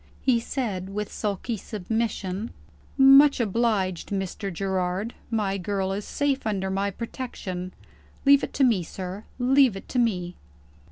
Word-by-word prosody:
He 250 -3 +3
said 210 -7 -3
with 210 +1 -4
sulky 210 +3 -2
submission: 215 0 -3 0.5
"Much 275 +1 +7
obliged, 210 -5 0
Mr. 195 0 -3
Gerard. 190 +3 -2 0.2
My 205 -4 0
girl 190 +1 -1
is 200 +1 -3
safe 280 -4 -1
under 190 -3 -1
my 195 +1 0
protection. 195 -5 -6 0.5
Leave 280 0 +6
it - - -4
to 275 - +2
me, 230 -8 +4
sir 185 +4 -7
leave 260 -2 +4
it 195 - -9
to 250 - 0
me." 180 -7 0
205 Hz, 135 wpm, -26 LUFS, 190-240 Hz, 0.5 s, Much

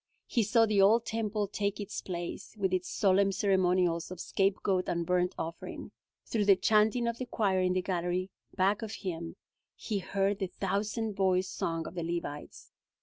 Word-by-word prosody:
He 240 - +1
saw 225 +2 +4
the 210 -2 +3
old 220 +4 +5
Temple 215 -2 -1
take 200 0 -2
its 205 0 -5
place, 175 +3 -6
with 190 -2 0
its 185 -1 -1
solemn 195 -1 +3
ceremonials 180 -3 +2
of 185 -1 -8
scapegoat 195 -1 0
and 170 -1 -1
burnt 180 0 +1
offering. 165 +1 -6 0.3
Through 215 -3 0
the 200 -1 +7
chanting 220 +4 +3
of 235 0 -2
the 255 - -4
choir 195 -5 +1
in 180 0 +2
the 185 0 0
gallery 180 0 -1 0.2
back 200 +3 +2
of 220 -1 -5
him 170 -3 -5 0.4
he 210 -3 -3
heard 195 +1 0
the 190 - -1
thousand 205 +4 -2
voiced 185 -1 +1
song 165 -1 -2
of - - -7
the 175 - -4
Levites. 165 -3 -5
195 Hz, 175 wpm, -30 LUFS, 180-210 Hz, 0.4 s, the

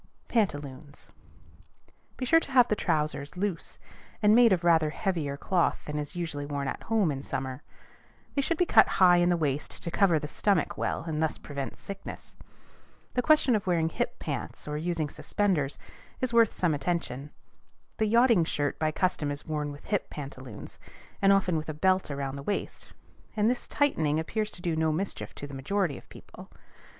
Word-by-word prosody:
PANTALOONS. 145 - -2 1.1
Be 255 - -2
sure 325 +6 +6
to 285 - -8
have 250 -2 +6
the 210 - +2
trousers 155 -3 -1
loose, 190 -3 -3 0.5
and 210 0 +6
made 235 -1 +7
of 180 -2 +2
rather 165 -3 +4
heavier 155 -6 -2
cloth 175 +3 0
than 150 0 -3
is 145 +2 -5
usually 165 -5 -3
worn 140 -1 -3
at - - -4
home 215 -8 +1
in 135 -1 -4
summer. 130 0 -4 0.7
They 280 - +1
should 330 +4 0
be 360 - +3
cut - - +6
high 180 -2 +7
in 175 0 +3
the 175 - +3
waist 145 -3 -2
to 170 - -3
cover 180 -4 +4
the 150 - -4
stomach 190 +1 +1
well, - - -2
and 160 -2 -3
thus 160 - 0
prevent 140 -2 -6
sickness. 195 -1 -8 0.8
The 250 - +1
question 290 -3 +4
of 205 -3 -2
wearing 165 -3 +2
"hip - - -2
pants," - - -5
or 150 - -3
using 160 0 -1
suspenders, 155 -3 0 0.4
is 255 -2 -1
worth 230 -2 +5
some 175 -4 +1
attention. 145 -3 -2 0.7
The 220 - +1
yachting 230 -4 +5
shirt 145 -2 -2
by 155 - +2
custom 180 -3 0
is 145 0 -4
worn 150 -2 -2
with 145 - -11
hip 205 -2 -1
pantaloons, 130 -6 -9 0.4
and 195 0 +5
often 190 -4 +3
with 155 0 -4
a 155 - -4
belt 185 +3 +2
around 140 -1 -3
the - - -6
waist; 200 +8 -4 0.5
and 215 +3 +4
this 250 - -3
tightening 160 - +1
appears 210 +6 -2
to 175 - -11
do 170 -3 0
no 160 0 +2
mischief 190 +6 -3
to - - -6
the 145 - -10
majority 155 +4 -1
of - - -22
people. - - -13
165 Hz, 185 wpm, -28 LUFS, 145-200 Hz, 1.1 s, made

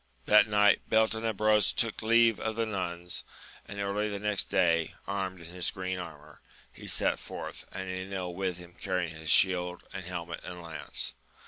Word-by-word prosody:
That 105 +1 +7
night 105 0 +4
Beltenebros 110 -1 +3
took 115 -2 0
leave 115 -1 +5
of 110 -1 -2
the 115 0 +1
Nuns, 90 -4 -2 0.4
and 100 - -7
early 100 +2 0
the 100 - -3
next 105 0 +1
day, 85 -2 +2
armed 95 -2 -3
in 85 - -11
his 90 -1 0
green 95 -1 -3
armour, 75 -4 -10 0.3
he - - -10
set - - +3
forth, - - -7
and 95 0 -5
Enil 95 -1 -4
with 90 -1 -2
him 90 -1 -12
carrying 90 -4 -1
his 80 -1 -7
shield 90 -1 +3
and 95 - -5
helmet 85 -1 -5
and 90 -1 -7
lance. 80 -6 -4
95 Hz, 165 wpm, -30 LUFS, 90-105 Hz, 0.4 s, That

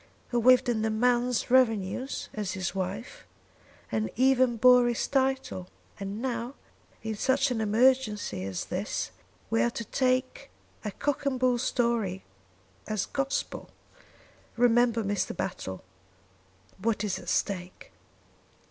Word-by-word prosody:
"Who 240 -1 +1
lived 255 +2 +6
on 235 -3 +1
the 220 - +1
man's 245 +2 +1
revenues 250 0 +1
as 210 -4 -3
his 190 -1 -3
wife, 195 +4 -5 0.7
and 215 0 0
even 255 -1 +3
bore 250 +1 +6
his 240 -2 -1
title, 265 -9 0 0.3
and 200 +1 -5
now 245 +1 -3 0.5
in 220 0 -2
such 265 +5 +1
an 225 -3 -1
emergency 220 - +2
as 95 -2 -4
this - - -3 0.4
we 115 - +3
are 120 - +3
to 230 - -6
take 255 +1 0 0.3
a 215 - -2
cock 285 +7 -2
and 260 -2 0
bull 250 -1 +2
story 235 -7 0 0.6
as 215 -2 -1
gospel. 275 0 -3 0.9
Remember, 240 -1 +3
Mr. 195 -3 -2
Battle, 95 - -4 1.0
what 215 +1 0
is 205 -3 -1
at - - -7
stake." 180 -2 -2
235 Hz, 130 wpm, -28 LUFS, 205-255 Hz, 1.0 s, lived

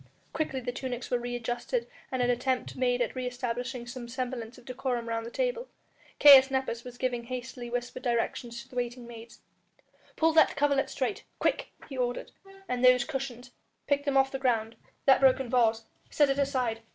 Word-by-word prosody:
Quickly 275 -4 -2
the 245 0 -3
tunics 250 -1 -5
were 245 - +2
re 245 0 -4
adjusted 240 - -2 0.3
and 260 -1 0
an 245 - +1
attempt 255 +1 -1
made 245 -1 +1
at 230 - -4
re 255 -1 -2
establishing 245 0 -4
some 240 0 -7
semblance 245 -1 -5
of 245 - -16
decorum 250 -2 -3
round 230 0 -2
the - - -5
table. - - -2 0.5
Caius 275 -2 +9
Nepos 265 -3 -2
was 245 -1 -10
giving 245 -2 -2
hastily 250 0 -6
whispered 245 +1 -4
directions 235 -1 -2
to - - -20
the 255 - -15
waiting 245 0 -3
maids. 235 0 -12 0.7
"Pull 325 0 +3
that 315 - +5
coverlet 280 -1 +2
straight, 280 +9 -2
quick!" - - 0 0.2
he 270 - -8
ordered, 245 -1 -2 0.4
"and 250 -3 -2
those 250 -1 +6
cushions, 255 -3 -5 0.3
pick 285 0 +1
them 280 -2 +1
off 270 0 +4
the 270 - -4
ground... 230 -4 0 0.3
that 270 -1 +6
broken 265 -2 +4
vase, 225 -3 +3 0.3
set 290 -2 +3
it 275 - -1
aside.... 255 -5 0
250 Hz, 185 wpm, -29 LUFS, 240-270 Hz, 0.7 s, Caius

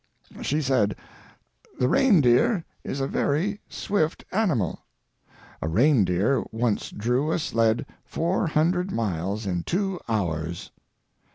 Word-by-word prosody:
She 150 +2 0
said: 110 -7 +2 0.8
"The 125 - +2
reindeer 170 - +4 0.2
is 135 - -4
a 135 - 0
very 185 +10 0
swift 165 -6 -1
animal. 165 - 0 0.8
A - - -2
reindeer 110 - +3
once 115 -1 -1
drew 125 +8 0
a - - +1
sled 115 -4 +1 0.2
four 170 +2 -1
hundred 175 +5 +1
miles 100 - -2
in 90 -3 -1
two 190 - -1
hours." 85 -6 -2
130 Hz, 110 wpm, -25 LUFS, 105-165 Hz, 0.8 s, reindeer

